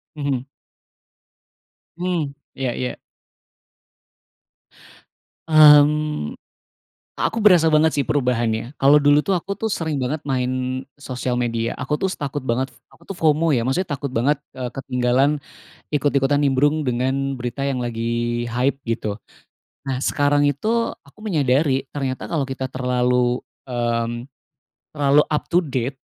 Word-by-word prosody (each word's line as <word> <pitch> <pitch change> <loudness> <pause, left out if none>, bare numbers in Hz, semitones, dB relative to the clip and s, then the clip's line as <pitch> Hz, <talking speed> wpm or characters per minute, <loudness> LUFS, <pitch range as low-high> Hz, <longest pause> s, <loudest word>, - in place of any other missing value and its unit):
Mhm. 140 -4 -2 1.5
Mmm, 170 -6 -2 0.2
iya 130 -2 -1
iya. 125 - -3 2.5
Mmm, 150 - +5 0.8
a - - 0
aku 225 - -3
berasa 180 -7 +5
banget 155 0 +4
sih 140 - 0
perubahannya, 120 -1 0
kalau 145 +2 +6
dulu 145 +1 +4
tuh 195 - 0
aku 200 +4 -5
tuh 220 0 -3
sering 160 -5 -2
banget 145 +5 -2
main 130 0 -1 0.2
sosial 125 -2 -3
media, 115 -1 -1
aku 140 +4 -1
tuh 190 +4 -1
s - - -7
takut 145 -1 -4
banget 130 +1 0 0.2
aku - - -22
tuh 195 - -4
FOMO 155 -1 +3
ya, 115 - +1
maksudnya 165 +9 -1
takut 140 -1 -5
banget, 135 +4 +1 0.2
eee, 125 -2 -4
ketinggalan 130 +3 +1 0.5
ikut-ikutan 145 -1 +2
nimbrung 145 +2 +2
dengan 130 +2 -1
berita 125 +2 -4
yang 135 - -1
lagi 120 0 -2
hype 130 +4 0
gitu. 110 -2 -2 0.7
Nah, 130 - -1
sekarang 145 +1 +2
itu 220 - 0
aku 140 +9 -22
menyadari, 140 -6 +1
ternyata 135 -3 -4
kalau 150 -5 0
kita 130 -1 -4
terlalu, 125 -1 +1 0.3
mmm, 120 0 -2 0.6
terlalu 145 0 +4
up 150 - 0
to 175 +1 +3
date, 130 -2 -3
135 Hz, 130 wpm, -21 LUFS, 125-150 Hz, 2.5 s, kalau